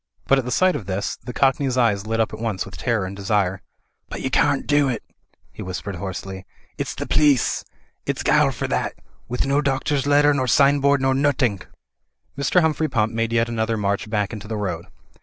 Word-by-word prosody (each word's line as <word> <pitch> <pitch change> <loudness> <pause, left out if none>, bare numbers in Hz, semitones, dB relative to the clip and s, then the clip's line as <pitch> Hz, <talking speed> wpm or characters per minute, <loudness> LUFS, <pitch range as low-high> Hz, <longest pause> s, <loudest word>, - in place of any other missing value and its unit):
But 135 - +4
at 130 - -3
the - - -3
sight 185 +7 +3
of 100 - -5
this 95 +1 -2
the 125 - -9
cockney's 135 +1 +1
eyes 110 -4 +2
lit 115 0 -1
at 110 -1 +1
once 110 -4 -2
with 95 - -10
terror 100 +5 -1
and 95 +1 -6
desire. 100 -2 0 0.5
''But - - -6
yer 130 - -2
cawnt 145 -2 +2
do 145 -1 +3
it," 120 -4 -3 0.5
he - - -9
whispered 95 +1 -5
hoarsely, 95 +1 -6 0.3
"its - - -4
the - - -4
pleece. 145 -5 +2 0.4
Ifs - - -2
gile - - +4
for - - -3
that, - - -1 0.3
with 125 +2 -1
no 140 +2 +2
doctor's 140 0 0
letter 145 0 +5
nor 130 -2 0
sign 140 +4 +4
board 140 0 +2
nor 135 0 +3
nothink." 130 -7 +1 0.7
Mr. 140 +6 +2
Humphrey 160 -1 +1
Pump 110 -3 0
made 115 0 -1
yet 115 0 +2
another 115 -1 -1
march 100 +1 -1
back 105 0 -1
into 105 -1 -7
the 110 0 -3
road. 90 -5 -3
115 Hz, 200 wpm, -22 LUFS, 100-140 Hz, 0.7 s, letter